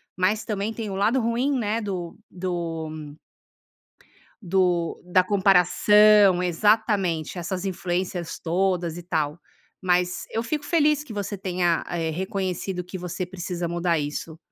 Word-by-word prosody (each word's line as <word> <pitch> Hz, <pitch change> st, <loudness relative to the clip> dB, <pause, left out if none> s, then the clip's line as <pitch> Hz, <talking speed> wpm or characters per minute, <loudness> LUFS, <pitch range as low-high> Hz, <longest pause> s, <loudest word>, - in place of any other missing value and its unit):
mas 195 Hz, +4 st, +1 dB
também 210 Hz, 0 st, -2 dB
tem 220 Hz, -2 st, -5 dB
o 190 Hz, -, -4 dB
lado 215 Hz, +7 st, +2 dB
ruim, 245 Hz, +4 st, 0 dB
né, 225 Hz, 0 st, -1 dB
do 180 Hz, -5 st, -4 dB
do 165 Hz, -4 st, -5 dB, 1.3 s
do 175 Hz, -2 st, +1 dB
da 180 Hz, +1 st, +3 dB
comparação. 200 Hz, +1 st, +5 dB
Exatamente. 190 Hz, -3 st, +1 dB
Essas 180 Hz, +2 st, -3 dB
influências 180 Hz, -1 st, -3 dB
todas 175 Hz, -1 st, 0 dB
e 175 Hz, -, -8 dB
tal. 155 Hz, -2 st, -1 dB, 0.4 s
Mas 180 Hz, -1 st, +1 dB
eu 225 Hz, -, -1 dB
fico 295 Hz, +5 st, -3 dB
feliz 300 Hz, -2 st, +2 dB
que 230 Hz, -, -9 dB
você 205 Hz, 0 st, -4 dB
tenha, 180 Hz, -3 st, 0 dB
eh, 165 Hz, -2 st, -2 dB
reconhecido 185 Hz, +1 st, -3 dB
que 180 Hz, +2 st, -7 dB
você 180 Hz, +1 st, -4 dB
precisa 175 Hz, -1 st, -4 dB
mudar 170 Hz, -1 st, 0 dB
isso. 150 Hz, +2 st, -5 dB
185 Hz, 130 wpm, -24 LUFS, 175-205 Hz, 1.3 s, comparação